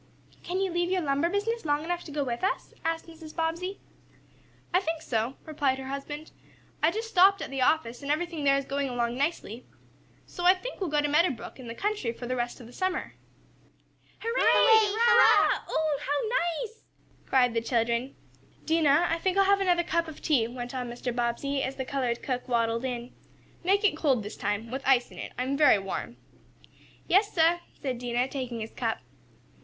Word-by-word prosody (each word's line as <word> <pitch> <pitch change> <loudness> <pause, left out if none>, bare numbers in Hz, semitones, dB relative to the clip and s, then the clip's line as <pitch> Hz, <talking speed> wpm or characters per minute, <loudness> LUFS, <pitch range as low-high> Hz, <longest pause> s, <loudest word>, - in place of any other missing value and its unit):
"Can 365 +2 -3
you 385 -1 0
leave 345 +1 0
your 370 -1 +1
lumber 285 +3 +1
business 440 +5 -1
long 295 -1 0
enough 350 +1 -3
to 305 - -9
go 290 0 -1
with 240 +1 -4
us?" 385 - -1
asked 330 0 -1
Mrs. 325 -2 -12
Bobbsey. 340 +4 -2 0.9
"I 365 - +5
think 330 -4 -3
so," 230 +3 -1
replied 285 -4 0
her 265 0 -7
husband. 290 +3 -6 0.5
"I 310 - +5
just 440 +6 -3
stopped 390 -2 +5
at - - -6
the 270 -1 -2
office, 250 -4 +1
and 280 - -6
everything 330 0 -2
there 275 -1 +4
is 275 - -3
going 280 0 -2
along 240 -1 -1
nicely. 265 -5 -2 0.6
So 350 - -7
I 365 +2 +7
think - - -7
we'll 370 - -1
go 295 0 +2
to - - +2
Meadow 320 +5 +4
Brook, 265 0 -8
in 250 - -9
the 230 - -6
country, 410 - -1
for 240 +1 -8
the 255 +1 -2
rest 240 -1 -3
of 245 - -11
the 240 - -14
summer." 370 +4 -2 1.0
"Hurray! 460 +2 -1
Hurrah! 440 +1 +5
Oh, 310 -3 0
how 340 - 0
nice!" 450 0 -14 0.5
cried 250 -3 +3
the 230 - 0
children. 235 +2 0 0.5
"Dinah, 320 0 +3
I 335 - 0
think 375 +2 0
I'll 395 - +6
have 400 0 +3
another 355 -2 +3
cup 335 0 0
of 315 - -9
tea," 260 -8 +2
went 245 +1 -7
on 250 -2 -3
Mr. 240 0 -4
Bobbsey, 245 +4 -1
as 265 +1 -3
the 265 - -4
colored 255 -3 -2
cook 255 -1 -3
waddled 230 0 0
in. 245 -1 -4 0.5
"Make 395 +4 +2
it 405 -7 +3
cold, 275 -8 +1
this 210 - -7
time 215 +3 -3
with 265 +1 -3
ice 255 -2 +3
in - - -11
it. - - -6
I 250 - 0
am 270 +2 -1
very 295 -6 +6
warm." 195 +4 -5 0.9
"Yais 405 +3 +3
sah," 335 0 +3 0.2
said 260 -4 -3
Dinah, 245 +1 -1
taking 255 -4 -4
his 220 - -6
cup. 230 -3 -2
285 Hz, 200 wpm, -28 LUFS, 245-350 Hz, 1.0 s, I